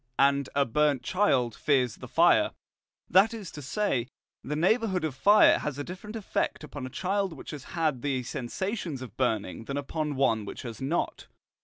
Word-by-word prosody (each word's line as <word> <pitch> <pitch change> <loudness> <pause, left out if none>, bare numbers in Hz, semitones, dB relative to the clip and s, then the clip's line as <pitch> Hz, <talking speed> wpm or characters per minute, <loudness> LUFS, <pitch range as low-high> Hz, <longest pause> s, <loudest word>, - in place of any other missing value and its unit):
& 125 - -47 0.4
A 140 0 +3
burnt 145 +1 +1
child 130 - +2
fears 130 -4 +1
the - - -9
fire, - - +4 0.5
that 200 +6 +4
is 205 -6 -7
to 145 - -8
say, 130 - -1 0.4
the 150 - -3
neighbourhood 190 +2 +2
of 155 -3 -1
fire 205 +11 +6
has 150 -2 -4
a 145 - -3
different 185 +7 -8
effect 210 -6 -2
upon 145 -3 -6
a - - -8
child 190 +5 -1
which 145 - -9
has 150 -4 -8
had 155 -6 +1
the 130 -2 -1
sensations 150 - -4
of 115 -4 -10
burning 115 -4 -1
than 140 +3 -3
upon 150 +1 -3
one 115 -5 +2
which 100 - -7
has 115 -2 -7
not. 150 +6 -2
145 Hz, 180 wpm, -28 LUFS, 130-185 Hz, 0.5 s, fire